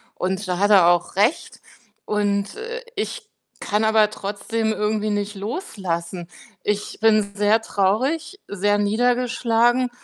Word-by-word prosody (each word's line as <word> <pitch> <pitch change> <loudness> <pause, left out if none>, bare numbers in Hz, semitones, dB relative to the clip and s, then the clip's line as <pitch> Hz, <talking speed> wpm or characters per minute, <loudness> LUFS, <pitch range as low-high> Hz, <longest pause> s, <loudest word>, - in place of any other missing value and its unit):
und 190 +2 -2
da 180 - 0
hat 205 +2 +2
er 185 -4 +7
auch 175 +1 +1
recht. 215 - 0 0.4
Und, 205 -1 -1
äh, 470 +2 -6
ich 480 -3 -4 0.4
kann 210 +2 0
aber 220 -1 +4
trotzdem 220 +2 -3
irgendwie 210 0 -1
nicht 205 0 -2
loslassen. 185 - -4 0.4
Ich 210 0 -2
bin 215 -2 +3
sehr 210 +2 +3
traurig, 260 - -1
sehr 205 +1 0
niedergeschlagen. 240 +2 +2
210 Hz, 125 wpm, -22 LUFS, 200-230 Hz, 0.4 s, er